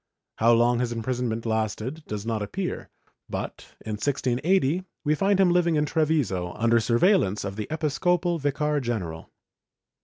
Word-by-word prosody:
How 115 +2 +5
long 120 +1 +3
his 120 -1 -1
imprisonment 120 -1 -2
lasted 110 +6 -2
does 105 0 -5
not 115 -2 -1
appear 180 - -4 0.4
but, - - -6
in 110 - -4
1680, 140 - +1 0.2
we 150 -1 +2
find 195 +5 +2
him 185 -2 +5
living 175 -2 +3
in 150 0 +2
Treviso, 145 - 0
under 115 +2 +3
sm'veillance 115 - +2
of 100 0 -4
the 105 0 -4
episcopal 170 +3 0
vicar 145 +1 0
general. 95 - -4
125 Hz, 145 wpm, -26 LUFS, 110-160 Hz, 0.4 s, How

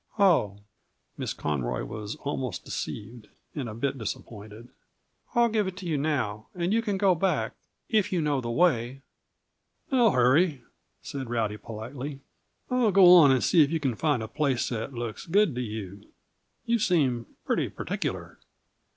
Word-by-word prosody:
"Oh!" 165 - +3 0.6
Miss - - -3
Conroy 65 -5 -2
was 105 0 -6
almost 130 -8 -4
deceived, 110 +1 -6 0.3
and 135 -6 -4
a 110 - -7
bit 135 +3 -2
disappointed. 110 +1 -7 0.7
"I'll 235 0 +5
give 215 -3 0
it 185 -1 -6
to 185 - -8
you 165 -3 -1
now, 130 -8 -1
and 175 +2 0
you 230 - +3
can 205 -4 -2
go 190 -1 +4
back 180 +2 0 0.3
if 210 -3 +1
you 180 - +1
know 145 -4 0
the 120 - -4
way." 130 -3 +1 0.9
"No 245 -4 +5
hurry," 135 0 +3 0.4
said 135 -4 -6
Rowdy 110 -3 -1
politely. 125 +7 -7 0.5
"I'll 250 -4 +3
go 185 -2 +8
on 165 -6 +8
and 130 -2 +2
see 170 - +5
if 145 - +4
you 165 +1 -1
can 135 -5 0
find 140 -1 0
a - - -5
place 135 0 0
that 115 +1 -4
looks 120 0 -6
good 195 -1 +3
to 125 - -3
you. 105 -4 -7 0.6
You 235 0 +1
seem 140 - +1 0.2
pretty - - 0
particular." - - -4
135 Hz, 160 wpm, -27 LUFS, 115-180 Hz, 0.9 s, go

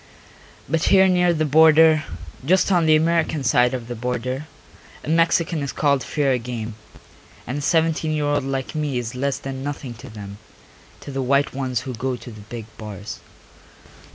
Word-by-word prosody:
But 160 +3 0
here 190 -1 +6
near 180 -1 +3
the 155 -2 0
border, 160 +1 +6 0.4
just 185 +7 +3
on 175 -3 +3
the 155 - +6
American 160 -2 +1
side 125 0 +3
of 120 -2 -6
the 120 - -4
border, 125 +4 -3 0.6
a - - -6
Mexican 165 0 +2
is 140 -2 -3
called 140 -3 +1
fair 135 -4 0
game, 115 -2 -5 0.7
and 135 +4 -3
a - - -5
seventeen 160 0 +1
year 150 -1 0
old 145 -1 +1
like 135 -1 -3
me 150 -4 -2
is 120 -2 -4
less 135 +2 -1
than 135 -1 -6
nothing 140 -3 -5
to 135 - -10
them, 100 -2 -9 0.6
to - - -8
the 135 0 -2
white 140 +2 +1
ones 130 -3 -2
who 130 -1 -6
go 125 +3 -2
to 120 0 -10
the 110 -1 -11
big 110 +1 -8
bars. 105 0 -7
135 Hz, 180 wpm, -22 LUFS, 125-155 Hz, 0.7 s, here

